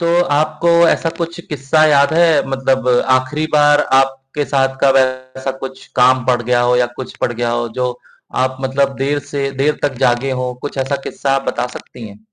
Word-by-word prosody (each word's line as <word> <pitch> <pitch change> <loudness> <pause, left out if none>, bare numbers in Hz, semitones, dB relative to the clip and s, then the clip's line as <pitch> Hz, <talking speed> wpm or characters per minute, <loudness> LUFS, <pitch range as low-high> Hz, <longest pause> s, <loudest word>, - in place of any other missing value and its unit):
तो 170 - -1 0.3
आपको 155 +3 0 0.2
ऐसा 165 - +1
कुछ 170 0 -4
किस्सा 150 +2 +1
याद 145 0 +3
है 170 +1 +5 0.2
मतलब 135 -1 0 0.3
आखिरी 150 +4 -1
बार 145 -1 +4 0.2
आपके 135 +2 -3
साथ 135 -1 0
कब 135 0 +4 0.4
ऐसा 130 0 -3
कुछ 130 0 -8
काम 125 0 +4
पड़ 125 -1 +2
गया 120 +1 +1
हो 125 - +3
या 125 - +2
कुछ 130 - -8
पड़ - - -1
गया 120 0 -2
हो 120 0 -2
जो 125 0 0 0.5
आप 130 0 -3
मतलब 135 +1 0
देर 140 +2 -1
से 140 -1 -1
देर 150 +1 +1
तक 145 -2 0
जागे 120 +3 +1
हो 125 - -3
कुछ 145 -1 -6
ऐसा 135 +1 -1
किस्सा 135 -1 -1
बता - - -1
सकती 115 - -11
है। 100 +1 -14
135 Hz, 190 wpm, -16 LUFS, 130-145 Hz, 0.5 s, है